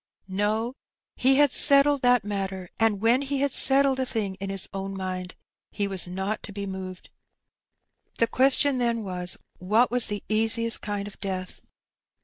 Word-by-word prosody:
No; 210 +5 -1 0.4
he 265 +1 +3
had 290 -1 +4
settled 280 0 +4
that 245 -3 +3
matter^ 195 -3 -4
and 220 -3 +1
when 235 +4 +3
he 280 0 -2
had 280 -1 +1
settled 270 0 +5
a 260 - 0
thing 210 -5 -2
in 195 0 -5
his 195 -2 -2
own 195 0 -5
mind 185 -1 -5 0.3
he 205 - -2
was 190 -2 -1
not 190 +4 -3
to - - -7
be 200 0 -5
moved. 190 -1 -8 1.1
The 230 - +3
question 265 +2 +2
then 235 -2 0
was^ 180 -2 -3 0.2
what 215 +7 +2
was 245 -1 0
the 205 -1 -4
easiest 225 +1 +1
kind 205 -1 -4
of 205 - -12
death? 185 -2 -5
210 Hz, 165 wpm, -25 LUFS, 195-250 Hz, 1.1 s, settled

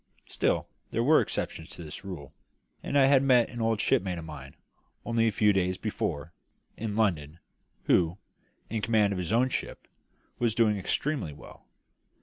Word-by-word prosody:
Still, - - 0 0.2
there 115 - 0
were 155 +5 +6
exceptions 80 +1 -4
to 85 - -9
this 75 +3 -7
rule; 75 -8 -8 0.5
and 145 - -1
I 135 - +6
had 135 -1 +5
met 125 -3 +4
an 120 - -5
old 115 -1 +1
shipmate 90 -3 +1
of 85 - -7
mine, 70 -4 -9 0.5
only 115 -1 +2
a - - +2
few 105 0 +3
days 95 -1 0
before, 75 +4 -3 0.4
in 110 -2 -4
London, 85 -8 0 0.5
who, 85 +1 +2 0.5
in 110 0 -3
command 105 -2 +2
of 95 - -3
his 90 +1 -3
own 125 +3 +3
ship, - - -4 0.5
was 115 -3 +1
doing 110 -3 +3
exceedingly 130 - -2
well. 70 - -14
105 Hz, 165 wpm, -28 LUFS, 85-115 Hz, 0.5 s, were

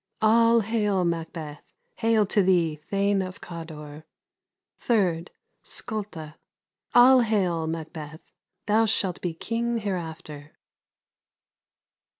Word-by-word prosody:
] - - -42
All 230 +1 +5
hail, 210 -4 0
Macbeth! 160 -3 -4 0.4
hail 225 -2 +3
to 200 +1 +2
thee, 175 -5 +2
Thane 200 0 +1
of 185 0 -6
Cawdor! 155 -3 -9 0.8
3rd. 180 -7 +1 0.4
Skulda. 185 -8 -5 0.6
All 250 +1 +8
hail, 185 -8 0
Macbeth! 160 -1 -6 0.4
thou 220 +2 +3
shalt 195 -4 -1
be 175 -3 -3
king 235 +5 -2
hereafter. 160 -7 -6
185 Hz, 100 wpm, -25 LUFS, 160-220 Hz, 0.8 s, All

